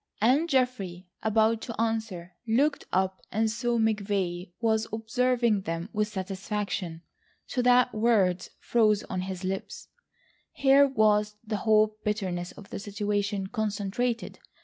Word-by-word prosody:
And 270 +10 +3
Geoffrey, 225 - 0 0.2
about 220 +1 +2
to 230 - -7
answer, 220 -6 -2
looked 275 +7 +2
up 190 0 0
and 220 +1 +1
saw 235 +1 0
McVay 200 -5 0
was 220 -1 +1
observing 235 0 +1
them 165 +2 -4
with 210 0 +1
satisfaction, 190 -3 -4 0.4
so 250 - -1
that 250 0 +4
words 205 -5 +2
froze 215 -3 +2
on 185 - -1
his 185 0 -5
lips. 195 - -4 0.6
Here 280 +1 +5
was 210 -4 +2
the 215 -1 -2
whole 215 0 +3
bitterness 185 -5 -2
of 205 - -14
the - - -4
situation 205 0 -2
concentrated. 215 +3 -2
215 Hz, 125 wpm, -28 LUFS, 195-230 Hz, 0.6 s, Here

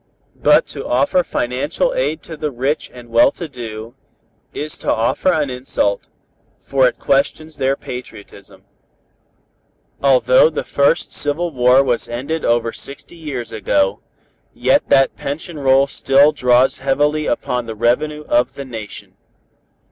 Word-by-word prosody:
But - - +5
to - - -6
offer 140 +8 +2
financial 145 - -1
aid - - -2
to 160 - -8
the 150 0 -3
rich 135 +4 -2
and 120 -1 -13
well 115 0 +5
to 170 - -7
do, 115 -4 -8 0.6
is 150 +1 -6
to - - -1
offer 115 +11 +1
an 150 -5 0
insult, 125 -5 -2 0.5
for 135 -2 +2
it - - -3
questions 150 +3 -1
their 135 +1 +1
patriotism. 100 -7 -10 1.4
Although 130 +1 +5
the 155 - -4
first 140 +4 +1
civil 160 +4 -2
war 125 0 +4
was 125 -3 -1
ended 140 +7 -3
over 115 -1 +1
sixty 140 +4 -11
years 145 -8 -6
ago, 95 -2 0 0.6
yet - - +2
that 135 0 +4
pension 150 +3 -6
roll 135 0 +4
still 140 +1 +3
draws 125 -3 +2
heavily 145 +3 0
upon 125 0 -2
the 110 - -5
revenue 150 +7 0
of 120 +1 +1
the 140 - -7
Nation. 110 -5 -9
135 Hz, 140 wpm, -18 LUFS, 120-150 Hz, 1.4 s, But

